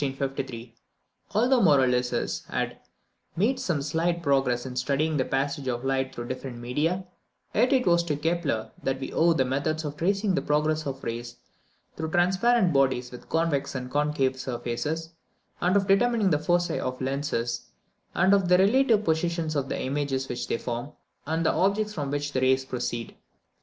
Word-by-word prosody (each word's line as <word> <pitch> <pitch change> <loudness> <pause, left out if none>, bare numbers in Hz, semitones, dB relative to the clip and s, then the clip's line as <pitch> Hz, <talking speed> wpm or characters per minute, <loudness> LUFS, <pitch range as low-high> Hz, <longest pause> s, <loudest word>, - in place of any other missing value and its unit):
Although 245 +4 +3
Maurolycus 125 -6 +2
had - - -3 0.6
made 220 +10 +1
some 155 -6 -1
slight 170 +3 0
progress 135 -4 +1
in 130 -1 -6
studying 145 +4 0
the 130 - +1
passage 140 +1 -1
of 120 0 -2
light 135 0 -1
through 120 0 -5
different 130 -1 -5
media, 150 +10 -1 0.5
yet 250 - +3
it 260 -3 +3
is 170 -1 +5
to 155 -3 0
Kepler 155 -8 -1
that 135 0 -1
we 135 - -5
owe 170 +1 +4
the 135 -5 +1
methods 150 +5 -1
of 145 0 -4
tracing 195 +4 +1
the 185 - +1
progress 155 +1 0
of 135 0 -5
rays 120 +1 -5 0.6
through 160 0 -3
transparent 185 +3 +3
bodies 130 -3 +2
with 125 - -11
convex 160 -5 0
and 125 -1 -5
concave 145 -3 +1
surfaces, 130 +7 -3 0.5
and 180 +2 +2
of 195 - +1
determining 215 0 +3
the 150 - +3
foci 175 +3 +1
of 130 0 -3
lenses, 130 -3 -2 0.5
and 190 - +4
of 195 -3 +3
the 180 - +6
relative 220 +2 +4
positions 165 -2 0
of 140 -1 -1
the - - -2
images 135 -1 -1
which 125 - -4
they - - 0
form, 120 +4 -5 0.3
and 160 +1 0
the - - +3
objects 210 +3 +1
from 145 -7 -3
which 145 0 -2
the 130 - 0
rays 130 0 +3
proceed. 120 -2 -4
150 Hz, 170 wpm, -26 LUFS, 130-175 Hz, 0.6 s, the